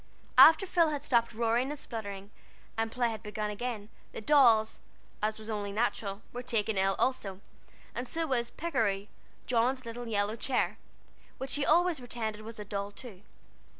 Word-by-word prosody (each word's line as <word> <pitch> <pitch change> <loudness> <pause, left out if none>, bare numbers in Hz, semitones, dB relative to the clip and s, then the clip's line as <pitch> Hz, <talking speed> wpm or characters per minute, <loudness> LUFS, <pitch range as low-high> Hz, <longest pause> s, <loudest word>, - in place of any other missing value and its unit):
After 325 +5 +9
Phil 345 -3 +3
had 290 -2 -3
stopped 235 -4 +2
roaring 235 +3 +1
and 295 - -4
spluttering, 205 -6 -7 0.4
and 225 0 -1
play 240 -1 +1
had 220 -1 -6
begun 210 0 -3
again, 215 -1 -4 0.3
the - - -5
dolls, 225 -4 +4 0.4
as 215 +1 0
was 220 0 -11
only 205 -2 -3
natural, 205 -2 -1
were 245 - -4
taken 225 -3 -1
ill 195 0 +2
also, 200 -7 -1 0.5
and 245 +2 -4
so 330 +4 -1
was 240 -5 0
"Pikery," 210 -12 -1 0.4
John's 255 +2 +1
little 235 +1 -6
yellow 210 -1 0
chair, 250 +2 -1 0.6
which 265 0 -5
she 290 -1 +1
always 345 -1 +4
pretended 225 -3 -4
was 225 +1 -9
a 210 - -6
doll 200 0 -3
too. 205 -2 -12
230 Hz, 165 wpm, -30 LUFS, 210-255 Hz, 0.6 s, After